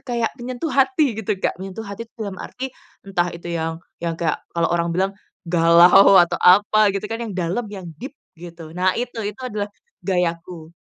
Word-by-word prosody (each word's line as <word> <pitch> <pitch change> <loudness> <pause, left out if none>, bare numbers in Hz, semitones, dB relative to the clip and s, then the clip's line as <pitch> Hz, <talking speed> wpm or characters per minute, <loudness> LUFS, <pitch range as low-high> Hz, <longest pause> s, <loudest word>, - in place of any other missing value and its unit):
kayak, 235 -3 -1
mmm, - - -28
menyentuh 255 +5 -4
hati, 270 0 +3
gitu, 210 -1 -1
Kak. - - -1
Menyentuh 195 +4 -7
hati 200 +3 -7
itu - - -56
dalam 200 -4 -5
arti, 265 0 -6 0.3
entah 180 -2 0
itu 170 0 -7
yang 165 0 -3 0.2
yang 170 -1 -1
kayak 165 -1 -1
kalau 170 0 +2
orang 170 0 0
bilang, 190 +1 +1 0.3
galau, 170 +3 +6
atau 175 - +1
apa, 205 +3 +5
gitu 200 +1 -3
kan, 225 +1 -3
yang 225 -3 -5
dalem 185 +6 -2
yang 190 -3 -8 0.2
deep 270 +3 -7 0.2
gitu. 170 -2 -10
Nah 185 +2 +1
itu 240 -1 -4
itu 210 +2 -6
adalah 210 -4 -3 0.3
gayaku 170 -2 -2
190 Hz, 190 wpm, -21 LUFS, 170-225 Hz, 0.3 s, galau